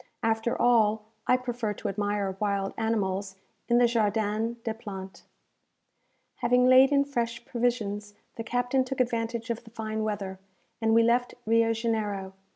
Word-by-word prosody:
After 225 +1 0
all, 220 -3 +3 0.2
I 250 - +5
prefer 240 -4 -3
to 215 - -5
admire 205 -1 -1
wild 200 -2 -1
animals 200 -3 -1 0.3
in 240 - +3
the 245 - +6
Jardin 220 0 0
des 225 - -2
Plantes. 195 -4 -8 1.2
Having 250 0 +3
laid 260 +2 +7
in 280 -1 +4
fresh 235 -4 -3
provisions, 210 -4 -2 0.2
the 230 - -5
captain 245 +3 +1
took 260 +1 -5
advantage 235 -1 -1
of 235 - -4
the 225 - -14
fine 220 -1 -4
weather, 200 -3 -3 0.4
and 225 0 +3
we 230 - +6
left 245 +2 +2
Rio 230 +1 +3
Janeiro. 215 -4 -2
225 Hz, 150 wpm, -28 LUFS, 210-240 Hz, 1.2 s, laid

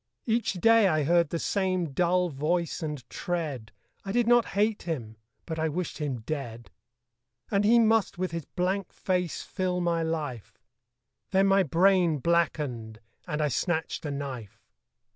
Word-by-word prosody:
Each 230 -2 +1
day 225 +3 +5
I 155 -4 +2
heard 170 +1 +3
the 170 - -2
same 185 -3 -1
dull 180 +3 +2
voice 160 +4 -1
and 150 -6 -5
tread; 150 - -4 0.3
I 195 - -4
did 240 +2 +2
not 240 0 +5
hate 210 +1 +2
him: 120 -10 -5 0.3
but 160 -1 -4
I 160 0 +1
wished 175 +3 -4
him 135 -6 -3
dead. 120 -3 -6 0.8
And 200 -1 +2
he 225 +3 +5
must 225 -4 +3
with 185 -1 -2
his 165 -3 -4
blank 190 +1 -2
face 180 -3 -2
fill 185 -1 -2
my 170 -1 0
life 150 -8 -4 0.7
Then 195 0 +3
my 195 0 +4
brain 180 0 +3
blackened; 140 -8 -1 0.3
and 150 +1 -1
I 150 - +1
snatched 160 +5 -1
a 150 - -3
knife. 135 -7 -6
170 Hz, 155 wpm, -28 LUFS, 150-190 Hz, 0.8 s, day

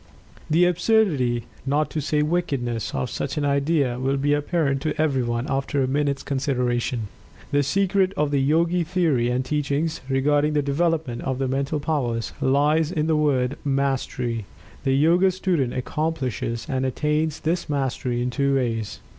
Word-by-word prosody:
The 165 +3 +4
absurdity, 170 - +2 0.2
not 145 +3 0
to 155 - -2
say 150 +1 +1
wickedness, 140 -9 -1
of 125 - -2
such 140 - -3
an 145 - 0
idea 140 -3 +1
will 135 +2 0
be 145 +2 +1
apparent 145 -2 0
to 155 - -2
everyone, 130 -6 0
after 135 -1 0
a - - 0
minute's 140 +1 0
consideration. 125 -4 -1 0.4
The 145 - +3
secret 190 +5 +2
of 150 -1 +1
the 140 -1 +2
Yogi 165 +5 +2
theory 155 -8 +1
and 125 +1 0
teachings 150 +3 -1
regarding 145 +3 +2
the 145 -1 +1
development 150 -3 0
of 130 -2 -2
the 135 0 -1
Mental 140 +3 -1
powers, 130 -7 -1
lies 150 +4 +2
in 155 -3 0
the 160 0 +2
word 140 -3 +1
"Mastery." 135 -5 -1 0.4
The 135 - +3
Yoga 170 +7 +4
student 175 -8 0
accomplishes 130 -5 -2
and 130 -3 -1
attains 150 +3 0
this 170 +1 -1
mastery 130 -3 -1
in 125 - -1
two 140 +1 +1
ways. 115 -5 -2
140 Hz, 155 wpm, -23 LUFS, 130-155 Hz, 0.4 s, The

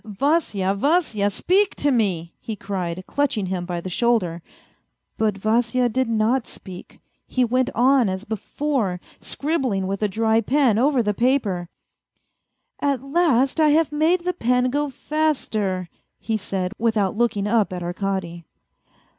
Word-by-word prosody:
" - - -39
Vasya, 215 - 0
Vasya, 220 - +1
speak 385 - +2
to 285 - +1
me," 185 -9 0
he 220 - -5
cried, 185 -3 -4
clutching 270 -8 0
him 180 -1 -3
by 175 -1 -3
the 170 - -7
shoulder. 185 -6 +1 0.7
But 215 -3 0
Vasya 235 +4 +1
did 260 +1 0
not 230 +3 +1
speak; 185 -2 -11 0.3
he 255 -1 +1
went 255 +2 +1
on 255 -2 +4
as 190 +1 -4
before, 220 -2 -2 0.2
scribbling 265 - -1
with 195 +2 -3
a 210 - +2
dry 220 +2 +1
pen 245 -2 +2
over 265 -1 +3
the 210 -1 0
paper. 210 -8 0 0.6
" - - -53
At 265 -2 -3
last 275 -2 +2
I 310 -1 +5
have 325 -2 +1
made 320 +4 +2
the 360 - 0
pen 250 -4 +1
go 290 +1 0
faster," 235 - -1 0.3
he 225 - -2
said, 190 -3 -3
without 215 -4 +1
looking 215 -3 0
up 210 -2 +2
at 180 -1 -4
Arkady. 175 -2 -3
225 Hz, 150 wpm, -22 LUFS, 195-270 Hz, 0.7 s, I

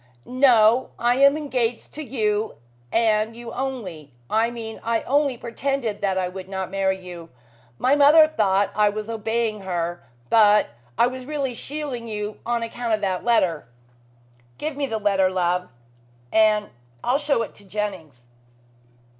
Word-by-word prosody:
"No. 250 -2 +4
I 240 +1 +2
am 280 +2 +5
engaged 250 -6 -2
to 310 - -6
you 220 -6 -1 0.4
and 220 -1 +2
you 235 -1 -8
only. 190 - -5 0.2
I 225 +2 +2
mean 225 -2 -7
I 230 0 0
only 280 -1 +1
pretended 235 -2 -3
that 195 -2 0
I 185 -1 0
would 185 +1 -8
not 190 -1 -4
marry 190 -1 0
you. 175 -3 -10 0.5
My 260 +3 +3
mother 295 +2 +7
thought 205 -9 +1
I 210 0 +4
was 210 +1 -5
obeying 225 0 -1
her, 175 -2 -3 0.3
but 210 -2 +5 0.3
I - - +5
was 255 +1 -5
really 280 -4 -2
shielding 270 -2 -4
you 210 -1 -5
on 235 -1 0
account 230 0 -1
of 215 - -8
that 190 -3 -1
letter." 185 -10 +1 0.9
"Give 305 -1 -4
me 280 -1 -2
the 225 - -2
letter, 200 -3 +2
love, 180 0 0 0.6
and 215 -1 +3 0.3
I'll 255 +3 +2
show 290 -6 +1
it - - -8
to 205 - -17
Jennings." 185 - -5
220 Hz, 155 wpm, -23 LUFS, 195-250 Hz, 0.9 s, mother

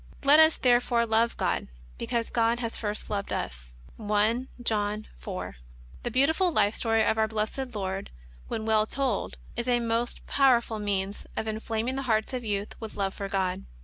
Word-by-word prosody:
Let 285 +3 +7
us 315 0 +6
therefore 240 -1 +3
love 225 +1 +2
God, - - 0 0.3
because 235 -1 -2
God 230 0 +2
first 225 -3 -3
hath - - -15
loved 200 -1 -2
us." - - -5 0.2
(I. 215 +4 +1 0.2
John 210 -1 0
4). - - -6 0.4
The - - -2
Ix^autiful 320 +7 +3
life 210 -7 +3
story 225 -1 +2
of 220 - +2
Our 220 - +3
Blessed 225 +4 -3
Lord, 195 -1 -3 0.4
when 220 - -3
well 215 -1 +3
told, 250 - -1 0.2
is 235 - -2
a 245 -1 +3
most 230 +1 -1
powerful 240 -5 +3
means 200 -1 -1
of 220 - -2
inflaming 225 +3 -2
the - - -1
hearts 220 +2 +1
of 250 -1 -2
youth 205 -2 -2
with 220 -1 -7
love 195 -1 -1
for 200 -1 -5
God. 190 -1 -1
220 Hz, 175 wpm, -28 LUFS, 205-240 Hz, 0.4 s, Let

